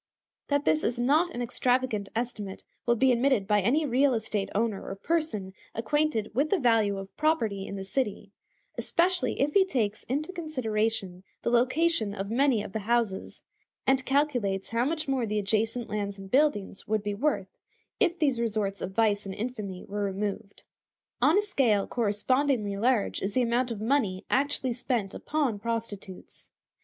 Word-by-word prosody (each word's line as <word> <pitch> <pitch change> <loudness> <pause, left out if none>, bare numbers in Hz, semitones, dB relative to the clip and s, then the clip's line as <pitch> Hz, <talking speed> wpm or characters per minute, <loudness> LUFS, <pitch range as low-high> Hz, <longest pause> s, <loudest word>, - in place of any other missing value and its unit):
That 285 0 +1
this 155 -1 +2
is 235 - 0
not 295 +8 +3
an 245 -7 -4
extravagant 245 -4 0
estimate 220 -5 -4 0.2
will 235 - +4
be 260 +2 +4
admitted 245 -3 +2
by 210 -1 +3
any 275 +10 +2
real 265 0 +3
estate 210 -3 -2
owner 215 -2 0
or 195 - -5
person 215 - -1 0.2
acquainted 230 -2 0
with 280 +6 +1
the 400 - +3
value 225 - +3
of 195 0 -8
property 230 -11 +1
in - - -5
the 195 - -5
city; 205 -2 -2 0.5
especially 355 +1 +1
if 290 +2 +1
he 395 - +6
takes 225 - -1
into 300 +8 -2
consideration 225 - -2 0.2
the - - 0
location 250 -2 +2
of 200 +1 -4
many 250 -3 +3
of 205 - -9
the 220 - -1
houses, 220 -2 -1 0.4
and 265 0 +3
calculates 250 -9 0
how 230 +2 +1
much 310 +1 -1
more 260 -4 0
the 210 0 -1
adjacent 220 +3 0
lands 200 -1 -3
and 195 -1 -10
buildings 255 -10 +1
would 215 -1 0
be 205 0 -2
worth 200 -5 -1 0.4
if 360 -5 +2
these 275 -7 +1
resorts 210 -3 -1
of 190 - -4
vice 210 -2 +2
and 190 - -5
infamy 210 -5 -5
were 205 +1 -4
removed. 200 +1 -4 0.6
On 315 +6 +5
a 415 - +3
scale 250 - +2
correspondingly 235 0 +1
large 230 +1 +1
is 195 +1 -3
the 255 - +3
amount 240 +2 +1
of 225 -3 -4
money 215 -5 0
actually 270 -2 +1
spent 235 -5 -1
upon 280 -9 -1
prostitutes. 215 -4 -5
230 Hz, 170 wpm, -28 LUFS, 205-270 Hz, 0.6 s, he